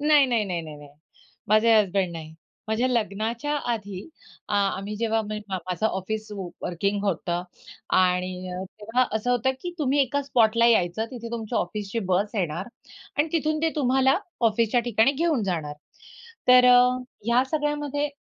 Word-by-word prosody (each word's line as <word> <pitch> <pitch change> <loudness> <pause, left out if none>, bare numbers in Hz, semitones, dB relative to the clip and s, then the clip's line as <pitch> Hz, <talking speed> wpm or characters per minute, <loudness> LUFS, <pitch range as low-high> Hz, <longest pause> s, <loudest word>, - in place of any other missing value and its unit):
नाही, 295 -1 +5
नाही, 235 -4 +1
नाही, 180 -4 -3
नाही, 155 -2 -9
नाही. 145 -1 -13 0.6
माझे 215 +2 +5
हजबंड 195 -3 +1
नाही. 160 -1 -8 0.3
माझ्या 220 +3 +1
लग्नाच्या 230 +4 -1 0.2
आधी 200 - -6 0.4
आ 205 - +1 0.2
आम्ही, 200 +2 -5
जेव्हा 225 0 0
म 215 - -3
माझं 185 +2 -2
ऑफिस 215 +2 -4
व 195 -3 -5 0.2
वर्किंग 200 +4 -1
होतं 175 -2 -1 0.5
आणि 180 0 +2 0.5
तेव्हा 225 +5 +1
असं 220 +3 -2
होतं 245 +1 +2
की 355 - -3
तुम्ही 285 -1 +2
एका 285 +2 -1
स्पॉटला 230 -4 +3
यायचं, 220 -2 +2
तिथे 235 -2 -7
तुमच्या 230 -1 -2
ऑफिसची 205 +4 -3
बस 200 +4 0
येणार 175 -1 -2 0.5
आणि 300 +2 +2
तिथून 310 -1 0
ते 325 - +2
तुम्हाला 265 +1 +3 0.3
ऑफिसच्या 230 +2 +1
ठिकाणी 240 +3 +3
घेऊन 310 -5 0
जाणार. 160 -6 -3 0.7
तर 250 0 +8
अ, 250 0 +6 0.3
या 240 +2 +3
सगळ्यामध्ये 295 -1 -1
220 Hz, 150 wpm, -25 LUFS, 195-255 Hz, 0.7 s, तर